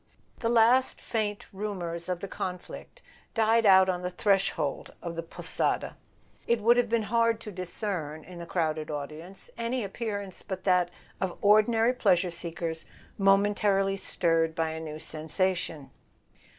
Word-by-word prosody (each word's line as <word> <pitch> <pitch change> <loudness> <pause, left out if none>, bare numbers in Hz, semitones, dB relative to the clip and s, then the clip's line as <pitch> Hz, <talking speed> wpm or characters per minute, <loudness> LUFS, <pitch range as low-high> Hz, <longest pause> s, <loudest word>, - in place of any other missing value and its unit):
The 230 - 0
last 240 +3 +4
faint 210 -3 -2
rumours 185 -4 -4
of 180 -1 -2
the 200 - -4
conflict 185 - -7 0.3
died 225 0 +4
out 190 -1 +7
on 180 -1 -1
the 180 - -2
threshold 190 -6 0
of 170 -1 -6
the 165 - -2
"Posada." 165 - -2 0.5
It 235 -1 +3
would 230 +3 +5
have 245 -2 +2
been 230 -1 +2
hard 230 +1 +2
to 210 - -7
discern, 180 -4 -4
in 180 -1 -11
the 170 - -7
crowded 155 -3 -1
audience, 155 +5 -7
any 230 -1 -1
appear¬ 205 0 -3
ance 190 -2 -10
but 190 -1 -6
that 180 -2 +3 0.3
of 185 -2 -2
ordinary 225 +3 +5
pleasure 185 -7 +2
seekers 165 -1 -4 0.3
momentarily 195 0 +3
stirred 165 -4 +1
by 165 -2 0
a 160 - -5
new 155 -1 -6
sensation. 160 -1 -2
190 Hz, 150 wpm, -28 LUFS, 170-215 Hz, 0.5 s, out